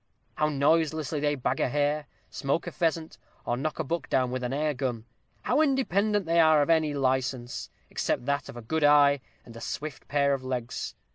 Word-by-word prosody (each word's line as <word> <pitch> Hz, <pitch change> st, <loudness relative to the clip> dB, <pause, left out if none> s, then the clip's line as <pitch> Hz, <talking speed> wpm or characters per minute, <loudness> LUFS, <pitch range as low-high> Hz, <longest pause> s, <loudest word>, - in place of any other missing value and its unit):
how 150 Hz, 0 st, +1 dB
noiselessly 155 Hz, +1 st, +1 dB
they 145 Hz, 0 st, +1 dB
bag 130 Hz, -, -1 dB
a -, -, +1 dB
hare, 145 Hz, +2 st, 0 dB, 0.2 s
smoke 140 Hz, +6 st, -1 dB
a -, -, -5 dB
pheasant, 165 Hz, -2 st, -1 dB, 0.3 s
or 120 Hz, -, 0 dB
knock 150 Hz, +5 st, -3 dB
a 160 Hz, -, -1 dB
buck 150 Hz, -2 st, -3 dB
down 130 Hz, -1 st, +1 dB
with 130 Hz, 0 st, -3 dB
an 125 Hz, -, -2 dB
air 150 Hz, +2 st, 0 dB
gun! 125 Hz, -4 st, -3 dB, 0.4 s
how 305 Hz, -, +2 dB
independent 210 Hz, -, +1 dB
are 165 Hz, -, 0 dB
they 170 Hz, -, +6 dB
of 155 Hz, -1 st, +4 dB
any 155 Hz, -3 st, +2 dB
license, 130 Hz, -2 st, -1 dB, 0.2 s
except -, -, -1 dB
that 140 Hz, +1 st, -1 dB
of -, -, -9 dB
a 120 Hz, -, -8 dB
good 160 Hz, +7 st, -1 dB
eye, 145 Hz, -1 st, +6 dB, 0.3 s
and 115 Hz, -, -13 dB
a 115 Hz, -, -9 dB
swift 150 Hz, -2 st, -6 dB
pair 140 Hz, -1 st, +2 dB
of 135 Hz, -1 st, -3 dB
legs! 125 Hz, -2 st, -4 dB
145 Hz, 200 wpm, -27 LUFS, 130-160 Hz, 0.4 s, they